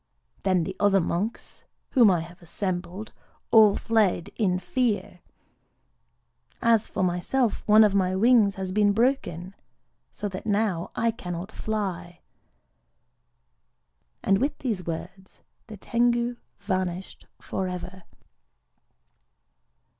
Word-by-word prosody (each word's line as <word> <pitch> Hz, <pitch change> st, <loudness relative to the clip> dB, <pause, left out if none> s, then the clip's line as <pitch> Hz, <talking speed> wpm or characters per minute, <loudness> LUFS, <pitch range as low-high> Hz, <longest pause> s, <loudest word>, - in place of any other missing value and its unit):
_' -, -, -32 dB
Then 185 Hz, -3 st, +2 dB
the 190 Hz, +3 st, -5 dB
other 200 Hz, -1 st, +4 dB
monks, 190 Hz, +6 st, -3 dB, 0.3 s
whom 240 Hz, -5 st, +6 dB
I 175 Hz, -3 st, +2 dB
had 170 Hz, +2 st, -12 dB
assembled, 180 Hz, +3 st, -4 dB, 0.4 s
all 215 Hz, -3 st, +7 dB
fled 205 Hz, -5 st, +1 dB
in 185 Hz, -5 st, +1 dB
fear. 205 Hz, -1 st, -1 dB, 1.4 s
As 230 Hz, -2 st, +3 dB
for -, -, -2 dB
myself, 185 Hz, +7 st, 0 dB
one 215 Hz, +1 st, +7 dB
of 210 Hz, -2 st, +3 dB
my 185 Hz, -2 st, +1 dB
wings 215 Hz, -1 st, +4 dB
has 190 Hz, -2 st, -4 dB
been 205 Hz, +1 st, +3 dB
broken,—so 205 Hz, -, -4 dB
that 185 Hz, +1 st, -7 dB
now 205 Hz, -5 st, 0 dB
I 230 Hz, 0 st, +1 dB
cannot 180 Hz, -3 st, -6 dB
fly." 180 Hz, -5 st, -4 dB, 2.0 s
And 195 Hz, 0 st, +3 dB
with 285 Hz, +4 st, -1 dB
these 210 Hz, -10 st, -3 dB
words 185 Hz, +3 st, -7 dB, 0.3 s
the 215 Hz, -2 st, -9 dB
Tengu 240 Hz, +2 st, 0 dB, 0.2 s
vanished 185 Hz, -2 st, -4 dB
forever. 185 Hz, 0 st, -5 dB
195 Hz, 110 wpm, -26 LUFS, 180-220 Hz, 2.0 s, all